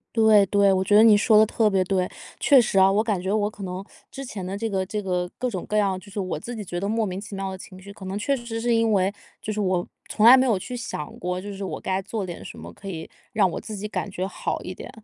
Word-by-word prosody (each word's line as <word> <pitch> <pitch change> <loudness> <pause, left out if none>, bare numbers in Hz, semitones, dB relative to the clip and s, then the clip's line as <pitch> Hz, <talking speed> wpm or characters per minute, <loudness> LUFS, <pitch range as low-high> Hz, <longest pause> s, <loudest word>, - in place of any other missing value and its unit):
对 220 -3 +6
对， 200 0 +3
我 190 -1 +2
觉 205 +2 +2
得 215 - +8
你 220 -2 +7
说 215 +1 +4
得 215 - +7
特 220 0 +2
别 190 -2 +2
对。 185 -1 0 0.3
确 275 -4 +6
实 195 -3 +1
啊， 190 0 +6
我 205 +2 +2
感 210 -5 -1
觉 190 +2 -1
我 210 -1 +1
可 205 - -10
能 185 0 -5 0.3
之 275 - -7
前 205 -8 -6
的 190 +2 -4
这 225 +2 -2
个 190 -2 -1
这 210 +2 -3
个 180 -2 -1
各 250 0 -1
种 185 -5 -5
各 210 - -2
样 195 -3 +2
就 200 - -15
是 200 +1 -4
我 185 -5 -3
自 240 +9 -7
己 215 - -5
觉 175 -2 -4
得 200 - -2
莫 225 +1 0
名 185 -1 -4
其 205 0 -8
妙 195 0 -3
的 190 - -6
情 185 0 -12
绪， 200 +2 -11
可 200 -1 -11
能 190 +1 -3
确 245 +7 0
实 230 -1 -5
是 240 0 +1
因 225 -1 +2
为， 195 0 +2 0.3
就 215 - -4
是 210 - -3
我 185 -3 0 0.2
从 215 - +2
来 250 +3 +10
没 260 - +3
有 230 -6 +2
去 250 +7 -6
想 150 -10 -6
过， 180 +1 -3
就 205 +2 -7
是 195 0 -5
我 - - -5
该 190 0 -1
做 205 +1 -4
点 175 -2 -7
什 - - -9
么 - - -9
可 195 - -12
以 160 -4 -6 0.2
让 200 -5 +3
我 - - -4
自 215 - -7
己 210 +1 -5
感 205 - -3
觉 185 -1 -3
好 190 - -3
一 185 - -6
点。 - - -10
200 Hz, 325 characters per minute, -24 LUFS, 185-215 Hz, 0.3 s, 来